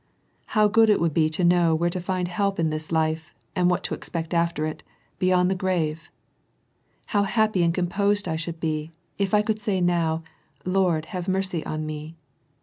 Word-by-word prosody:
How 210 0 +6
good 225 +1 +4
it 210 - +4
would 165 -2 +1
be 155 0 +3
to 160 +4 -1
know 175 -2 +4
where 170 +2 +1
to 180 - -3
find 180 0 -1
help 195 +2 -1
in 160 -1 +1
this 155 +1 -5
life, 160 0 -1 0.2
and 180 -1 +3
what 180 - 0
to - - -3
expect 165 0 -5
after 170 -2 +1
it, 155 0 -5 0.2
— - - -39
beyond 185 0 +3
the - - +3
grave! 170 -4 -1 1.0
How 205 - +4
happy 215 -1 +2
and 170 -1 +3
composed 200 +3 0
I 160 - -1
should 165 +1 -5
be, 155 0 -2 0.3
if 195 -1 0
I 210 - +4
could 215 0 -1
say 205 -3 0
oow, 165 -2 +1 0.2
' - - -37
Lord 175 -5 +2
have 180 -3 -4
mercy 190 -3 -1
on 155 0 -3
me 155 +1 -6
175 Hz, 200 wpm, -25 LUFS, 160-190 Hz, 1.0 s, How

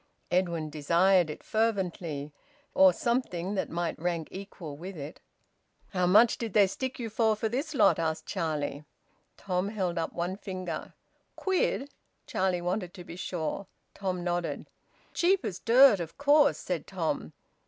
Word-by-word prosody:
Edwin 170 -4 0
desired 170 +4 +3
it 150 - -7
fervently, 180 -9 -1 0.4
or 285 0 +7
something 220 -8 -1
that 195 - -1
might 170 -1 -2
rank 170 -1 -2
equal 185 -6 -8
with 180 +4 -8
it. 145 +3 -7 0.7
"How 180 -2 +1
much 215 +6 +5
did 225 -4 -4
they 205 -2 +6
stick 260 +7 -4
you 235 - -4
for 220 0 +2
this 250 +8 -2
lot?" - - +5
asked 160 -1 -1
Charlie. 150 -2 -2 0.5
Tom 185 0 -1
held 185 -5 -2
up 165 - -2
one 175 +2 -3
finger. 185 -3 -6 0.4
"Quid?" 365 -7 0 0.3
Charlie 185 -2 0
wanted 180 +1 -2
to 180 - -9
be 170 - -9
sure. 180 +1 -3 0.3
Tom 185 -2 -3
nodded. 175 -1 -2 0.5
"Cheap 355 -4 +2
as 190 -4 -4
dirt, 240 -3 +6
of 165 -2 -6
course!" 290 +1 +5
said - - -4
Tom. - - -2
185 Hz, 145 wpm, -29 LUFS, 170-220 Hz, 0.7 s, or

